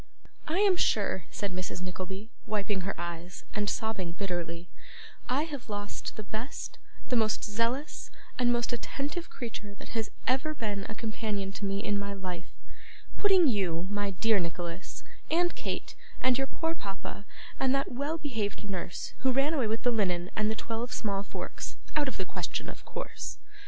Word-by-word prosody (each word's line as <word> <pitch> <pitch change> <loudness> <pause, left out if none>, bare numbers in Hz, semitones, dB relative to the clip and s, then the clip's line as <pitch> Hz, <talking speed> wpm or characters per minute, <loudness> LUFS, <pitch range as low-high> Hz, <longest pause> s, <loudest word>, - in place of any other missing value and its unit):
'I 325 - +2
am 390 -3 +7
sure,' 195 - +3
said 200 -2 -1
Mrs. 185 0 -2
Nickleby, 185 +4 -4 0.2
wiping 205 -2 +1
her 195 -1 -2
eyes, 175 +1 -4
and 205 -1 +2
sobbing 195 -6 0
bitterly, 175 -2 -2 0.6
'I 265 +4 +4
have 285 -7 -5
lost 205 0 -3
the 215 - -4
best, 220 +6 -4 0.3
the 250 - +4
most 220 -2 +3
zealous, 230 +7 0 0.3
and 245 -1 +6
most 240 0 +2
attentive 290 +7 -2
creature 215 -4 -5
that - - -9
has 225 -2 0 0.2
ever 285 +5 +3
been 205 -6 -1
a 220 - -3
companion 215 -3 -1
to 200 +1 -3
me 195 +1 +1
in 205 -2 +2
my 200 0 -1
life 185 -3 -4 0.7
putting 385 -5 +7
you, 185 -7 +2
my 205 0 +1
dear 210 +2 +4
Nicholas, 170 +1 -3 0.3
and 345 +2 +4
Kate, - - -2 0.3
and 255 0 +5
your 270 +1 +2
poor 325 +4 0
papa, 200 - -5 0.4
and 265 0 +5
that 275 - +1
well 285 +6 0
behaved 225 -10 -1
nurse 180 -3 -3
who 265 - +4
ran 275 +4 +4
away 265 -8 +3
with 220 +1 0
the 245 - +5
linen 180 -5 +2
and 215 0 +3
the 220 - +1
twelve 230 +2 -2
small 200 -3 +1
forks, 200 - -5 0.2
out 295 -2 +4
of 265 - -1
the 190 - 0
question, - - -2
of - - -8
course. - - -4
215 Hz, 170 wpm, -32 LUFS, 195-255 Hz, 0.7 s, am